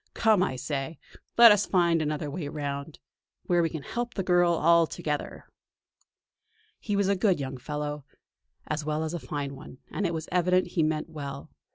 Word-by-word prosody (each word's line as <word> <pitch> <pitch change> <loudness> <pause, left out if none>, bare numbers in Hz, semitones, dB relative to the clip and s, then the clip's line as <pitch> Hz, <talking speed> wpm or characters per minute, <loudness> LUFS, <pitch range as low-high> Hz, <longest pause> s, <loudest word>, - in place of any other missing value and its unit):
Come, 220 -4 +4
I 130 - 0
say, 135 +3 -4 0.4
let 235 -1 +10
us 205 -1 +3
find 170 -3 +3
another 150 -1 -2
way 160 -1 -4
round; 145 0 -5 0.5
where 175 -1 +2
we 165 - +1
can 160 -4 -6
help 240 +8 -4
the 190 - -1
girl 175 -1 +3
all 170 0 +4
together!" 150 -4 -4 1.3
He 205 - -2
was 200 -1 +2
a 200 - +3
good 190 -2 +2
young 135 -1 -4
fellow, 150 +2 -4 0.6
as 150 0 -3
well 155 +1 -1
as 160 +1 -3
a 175 - -3
fine 140 -2 -4
one, 135 -1 -12
and 195 - -1
it 170 - -3
was 160 0 -5
evident 180 +1 +2
he 170 - 0
meant 155 +1 0
well. 140 -3 -7
160 Hz, 185 wpm, -27 LUFS, 145-180 Hz, 1.3 s, let